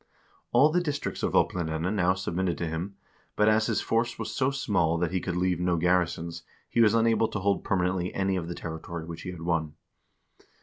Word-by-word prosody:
All 150 Hz, +3 st, +5 dB
the 175 Hz, +2 st, +2 dB
districts 145 Hz, -4 st, -3 dB
of -, -, -1 dB
Oplandene 85 Hz, +1 st, +1 dB
now 95 Hz, -2 st, +2 dB
sub 95 Hz, -2 st, -4 dB
mitted 90 Hz, 0 st, 0 dB
to 85 Hz, -, -2 dB
him, 85 Hz, +5 st, -4 dB, 0.4 s
but 105 Hz, -, +3 dB
as 110 Hz, 0 st, +4 dB
his -, -, 0 dB
force 115 Hz, +1 st, 0 dB
was -, -, -4 dB
so 130 Hz, 0 st, +1 dB
small 105 Hz, -12 st, +1 dB
that 85 Hz, -1 st, -1 dB
he 95 Hz, -, 0 dB
could 90 Hz, -, -3 dB
leave 90 Hz, -1 st, +1 dB
no 90 Hz, -1 st, +1 dB
garrisons, 85 Hz, -1 st, 0 dB, 0.3 s
he 120 Hz, -, +1 dB
was 110 Hz, -1 st, +5 dB
unable 115 Hz, 0 st, +3 dB
to 105 Hz, -, -4 dB
hold 100 Hz, 0 st, +1 dB
permanently 90 Hz, -1 st, 0 dB
any 95 Hz, -1 st, +1 dB
of 85 Hz, -3 st, -3 dB
the 85 Hz, -, -5 dB
territory 80 Hz, 0 st, -6 dB
which 85 Hz, 0 st, -7 dB
he 90 Hz, -, -6 dB
had 85 Hz, -3 st, -7 dB
won. 80 Hz, -3 st, -1 dB
90 Hz, 210 wpm, -27 LUFS, 85-105 Hz, 0.4 s, All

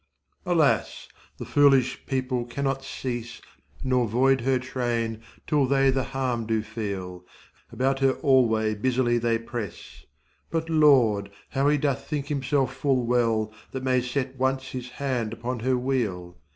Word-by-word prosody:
Alas! 165 Hz, -5 st, +1 dB, 0.3 s
the -, -, -6 dB
foolish 135 Hz, -3 st, +3 dB
people 130 Hz, -2 st, -1 dB
cannot 135 Hz, +2 st, -2 dB
cease, 120 Hz, -3 st, -5 dB, 0.4 s
Nor 125 Hz, -2 st, +2 dB
'void9 130 Hz, +3 st, +3 dB
her 130 Hz, +2 st, +2 dB
train10 120 Hz, -3 st, -2 dB, 0.2 s
till 145 Hz, -3 st, +2 dB
they 135 Hz, 0 st, +3 dB
the 130 Hz, -1 st, -1 dB
harm 125 Hz, -4 st, -2 dB
do 110 Hz, -1 st, 0 dB
feel, 100 Hz, -5 st, -5 dB, 0.5 s
About 135 Hz, +1 st, 0 dB
her 135 Hz, -1 st, +3 dB
alway 115 Hz, -6 st, +3 dB
busily 120 Hz, +2 st, +1 dB
they 115 Hz, 0 st, +1 dB
press; 115 Hz, -4 st, -7 dB, 0.4 s
But 165 Hz, 0 st, -2 dB
Lord! 125 Hz, -10 st, +4 dB, 0.2 s
how 135 Hz, +1 st, +1 dB
he 150 Hz, -, +3 dB
doth 140 Hz, -4 st, -1 dB
think 145 Hz, -1 st, -4 dB
himself 135 Hz, -2 st, 0 dB
full 130 Hz, -4 st, +1 dB
well 115 Hz, -3 st, +1 dB, 0.2 s
That 130 Hz, -1 st, -4 dB
may 130 Hz, -1 st, +2 dB
set 130 Hz, +1 st, -3 dB
once 130 Hz, 0 st, 0 dB
his 125 Hz, -1 st, -6 dB
hand 125 Hz, -4 st, -2 dB
upon 120 Hz, +2 st, -4 dB
her 130 Hz, +2 st, +1 dB
wheel. 110 Hz, -9 st, -2 dB
130 Hz, 145 wpm, -26 LUFS, 115-135 Hz, 0.5 s, Lord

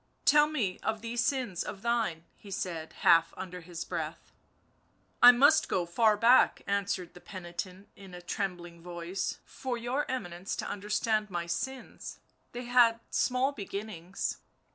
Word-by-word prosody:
" -, -, -42 dB
Tell 295 Hz, 0 st, +6 dB
me 235 Hz, -12 st, -2 dB
of 220 Hz, -1 st, -2 dB
these 235 Hz, +1 st, -1 dB
sins 255 Hz, -, -1 dB
of 195 Hz, +1 st, -6 dB
thine/' 225 Hz, -9 st, 0 dB
he 205 Hz, -, -14 dB
said, 170 Hz, -4 st, -4 dB
half 165 Hz, 0 st, +5 dB
under 180 Hz, -1 st, -7 dB
his 170 Hz, 0 st, -7 dB
breath. 165 Hz, -3 st, -5 dB, 0.5 s
" -, -, -40 dB
I 245 Hz, -, +12 dB
must 285 Hz, +5 st, +5 dB
go 180 Hz, -2 st, +1 dB
far 210 Hz, +5 st, +3 dB
back," 235 Hz, +4 st, +5 dB
answered 200 Hz, -3 st, -1 dB
the 175 Hz, -, -14 dB
penitent 185 Hz, +1 st, -7 dB
in 190 Hz, -2 st, -12 dB
a 180 Hz, -, -9 dB
trembling 175 Hz, -2 st, -4 dB
voice, 175 Hz, +2 st, -4 dB
" -, -, -41 dB
for 255 Hz, -2 st, -4 dB
your 245 Hz, +5 st, -2 dB
Eminence 180 Hz, -7 st, -4 dB
to -, -, -4 dB
understand 210 Hz, +1 st, -1 dB
my 175 Hz, -2 st, -3 dB
sins— 260 Hz, +10 st, -5 dB, 0.3 s
they 245 Hz, +1 st, -6 dB
had 240 Hz, -2 st, +5 dB
small 255 Hz, +2 st, +2 dB
beginnings." 200 Hz, -, -5 dB
200 Hz, 160 wpm, -30 LUFS, 175-240 Hz, 0.5 s, I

